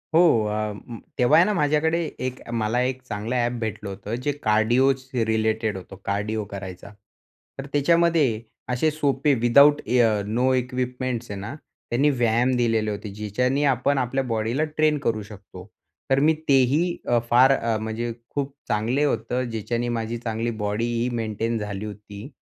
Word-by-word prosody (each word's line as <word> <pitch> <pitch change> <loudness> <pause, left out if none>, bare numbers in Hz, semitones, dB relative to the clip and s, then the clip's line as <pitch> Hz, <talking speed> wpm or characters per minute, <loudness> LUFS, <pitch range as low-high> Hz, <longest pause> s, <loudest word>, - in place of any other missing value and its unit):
हो, 170 - +7 0.2
अ, 105 0 -2 0.4
तेव्हा 125 -1 +5
आहे 170 - +6
ना 210 - +1
माझ्याकडे 155 +1 +1 0.3
एक 130 0 -7 0.2
मला 110 +3 0
एक 130 0 -2
चांगलं 115 0 -4
ॲप 120 -1 +1
भेटलं 110 -2 -4
होतं 100 +3 -5
जे 145 - +1
कार्डिओज 120 +5 +3 0.2
रिलेटेड 110 -2 0
होतं, 90 - -10
कार्डिओ 105 +2 -1
करायचा. 95 -1 -8 0.7
तर 135 - -4
त्याच्यामध्ये 155 -5 +3 0.3
असे 155 +6 +2
सोपे 145 -1 +1
विदाऊट 140 +5 +6
इ 125 - +2
अ, 110 -3 +3
नो 125 +5 +1
इक्विपमेंट्स 125 -2 -2
आहे 100 - -5
ना 105 +8 -6 0.4
त्यांनी 135 +5 +3
व्यायाम 120 -1 +2
दिलेले 115 -3 +1
होते 105 0 -6
ज्याच्याने 125 +7 -1
आपण 140 +3 0
आपल्या 135 +1 0
बॉडीला 115 +4 -1
ट्रेन 155 0 +1
करू 110 -2 0
शकतो. 100 -2 -12 0.4
तर 135 +1 +3
मी 155 +3 +4
तेही 140 +6 +3
अ, 120 -1 +3
फार 130 +3 +6
अ, 115 -2 -1
म्हणजे 110 +2 -3 0.2
खूप 140 -1 -3
चांगले 115 +7 0
होतं 125 -2 0
ज्याच्याने 115 +2 -2
माझी 115 +1 -3
चांगली 115 0 -3
बॉडीही 115 +3 -1
मेंटेन 115 +1 -2
झाली 105 -1 -5
होती. 105 +2 -9
120 Hz, 155 wpm, -24 LUFS, 110-135 Hz, 0.7 s, हो